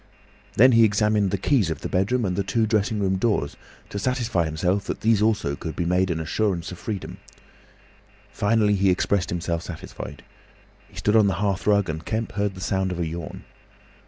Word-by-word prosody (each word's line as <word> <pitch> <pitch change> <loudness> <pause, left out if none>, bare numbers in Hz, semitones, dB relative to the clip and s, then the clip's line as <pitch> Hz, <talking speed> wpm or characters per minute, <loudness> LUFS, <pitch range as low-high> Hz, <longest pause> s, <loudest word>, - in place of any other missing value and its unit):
Then 125 +4 +7
he 115 -1 +6
examined 105 -1 +2
the 100 - -1
keys 110 - +2
of 80 - -4
the - - -3
bedroom 105 +6 0
and 90 -2 -1
the 100 - 0
two 110 +4 0
dressing 110 0 0
room 95 -1 +1
doors, 95 - 0 0.3
to 100 - -4
satisfy 120 -6 0
himself 90 +5 -1
that - - -4
these 110 -2 +3
also 105 -10 +1
could 80 +2 -6
be 85 - -2
made 90 +2 +1
an 85 -2 -1
assurance 90 +1 -1
of 90 - -9
freedom. 100 +1 -5 1.1
Finally 105 0 +2
he 95 0 +3
expressed 90 0 +1
himself 85 -1 -2
satisfied. 85 -2 -8 0.7
He - - -20
stood 105 - +1
on 110 -2 +5
the 95 - +1
hearth 100 -1 -1
rug 100 -2 +3
and 80 0 -4
Kemp 110 +4 -3
heard 100 0 -2
the 95 - -9
sound 95 +1 -1
of 90 - -4
a 85 - -1
yawn. 85 +1 -6
100 Hz, 195 wpm, -24 LUFS, 90-105 Hz, 1.1 s, Then